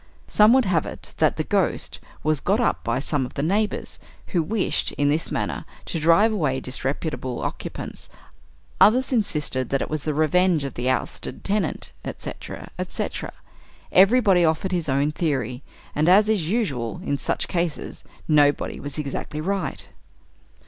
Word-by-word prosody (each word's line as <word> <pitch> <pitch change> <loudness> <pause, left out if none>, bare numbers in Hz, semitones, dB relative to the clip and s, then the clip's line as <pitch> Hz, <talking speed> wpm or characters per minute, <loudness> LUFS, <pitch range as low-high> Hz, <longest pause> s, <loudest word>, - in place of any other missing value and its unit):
Some 210 +1 +6
would 260 -1 +4
have 175 -5 +1
it - - -9
that - - +2
"the - - 0
Ghost" - - 0 0.2
was 155 -1 +1
got 200 - +1
up 240 - +1
by 115 +1 0
some 140 +1 0
of 125 - -7
the 140 - -1
neighbors, 205 +6 -1 0.3
who 175 - +1
wished, 200 +5 0
in 145 0 +1
this 155 +3 0
manner, - - -2 0.2
to 165 - -2
drive 170 +8 +5
away 145 -10 0
disreputable 135 -1 -3
occupants; - - -6 0.7
others 255 +6 +5
insisted 150 - 0
that 135 - +1
it - - -4
was 155 -1 -1
the 155 -2 -1
revenge 165 +1 +3
of 135 -3 -5
an 125 - -1
ousted 130 - -2
tenant, 200 -4 -1
etc., - - -7
etc. - - -3 0.6
Everybody 195 -2 +5
offered 160 +3 +1
his 170 -4 -1
own 140 +3 +2
theory, 135 -6 -2 0.3
and, 155 +3 +2
as 205 +3 +6
is 185 -8 +1
usual, 135 - -1
in 140 - -1
such - - -2
cases, 170 -3 -3 0.2
nobody 145 -2 +3
was 145 0 -4
exactly 150 +1 -4
right. 185 -2 -2
155 Hz, 155 wpm, -24 LUFS, 140-195 Hz, 0.7 s, Some